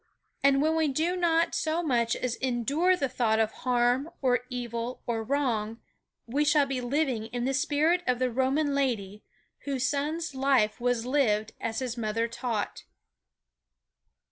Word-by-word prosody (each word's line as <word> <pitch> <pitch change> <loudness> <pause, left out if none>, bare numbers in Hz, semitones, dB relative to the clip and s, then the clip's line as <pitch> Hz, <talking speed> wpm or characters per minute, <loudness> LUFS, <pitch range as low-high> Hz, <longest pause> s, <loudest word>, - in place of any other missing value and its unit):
And 275 0 +4
when 315 +1 +2
we 320 -1 +2
do 320 +6 0
not 335 -2 +2
so 340 0 0
much 235 -6 +1
as 250 -2 -2
endure 275 +8 +1
the 275 - 0
thought 235 -3 +1
of 220 -1 +2
harm 250 +3 +1
or 250 -2 +1
evil 240 -1 -4
or 230 -2 -1
wrong 230 -4 -1 0.5
we 275 +6 0
shall 295 -1 +4
be 270 -2 -3
living 250 -3 -1
in 245 +1 -3
the 270 - 0
spirit 310 +4 +2
of 250 -1 +2
the 255 0 0
Roman 270 +4 +1
lady 215 -7 -1 0.4
whose 265 -2 0
son's 295 +3 -2
life 265 -5 +2
was 245 -1 0
lived 225 -6 +1
as 225 -1 -3
his 250 -2 -3
mother 225 +1 -1
taught. 230 -2 -4
255 Hz, 155 wpm, -28 LUFS, 235-290 Hz, 0.5 s, And